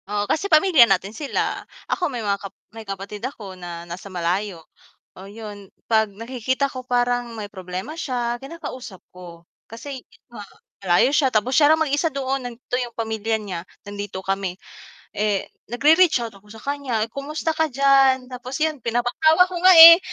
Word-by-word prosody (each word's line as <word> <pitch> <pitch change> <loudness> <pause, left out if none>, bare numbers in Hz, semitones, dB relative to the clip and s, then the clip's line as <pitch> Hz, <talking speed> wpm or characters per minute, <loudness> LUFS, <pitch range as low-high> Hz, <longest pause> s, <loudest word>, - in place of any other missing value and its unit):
Oo 205 0 -1
kasi 355 - -1
pamilya 310 -6 +6
natin 195 +2 0
sila, 285 +3 -2 0.2
ako 360 -3 -1
may 240 -5 -5
mga 200 -1 -1
kap 195 - -8 0.2
may 225 - -9
kapatid 195 +1 -6
ako 220 -7 -7
na 175 -2 -8
nasa 175 +3 -9
malayo 180 0 -3 0.5
oo 190 - -10
yun, 205 -1 -10 0.2
'pag 220 -1 +4
nakikita 260 +4 -2
ko 255 -1 -8
parang 245 -1 0
may 205 -2 -7
problema 185 - -6
siya, 240 -5 -2
kinakausap 270 - -9
ko. 175 -2 -12 0.3
Kasi 260 +4 -8 0.3
uh 220 - -8 0.4
malayo 190 +7 +3
siya 295 -2 +3
tapos 220 +1 0
siya 290 +1 +5
lang 320 +1 +4
mag-isa 290 +3 0
doon, 270 -1 -2
nandito 245 0 -6
yung 240 -2 -6
pamilya 220 -1 -2
niya, 195 -6 -6 0.2
nandito 205 -1 -6
kami, 195 -2 -2 0.6
eh, 205 -2 0 0.2
nagre-reach 310 +4 +4
out 225 - -7
ako 195 +1 -19
sa 220 - -13
kanya, 275 -6 -2
"Kumusta 300 +4 -3
ka 320 0 +1
diyan," 270 -1 +3
tapos 255 +1 -6
yun 315 -1 0
pinapatawa 245 +9 +3
ko - - -5
nga, 370 0 +8
eh, 335 +1 +12
235 Hz, 165 wpm, -22 LUFS, 200-275 Hz, 0.6 s, eh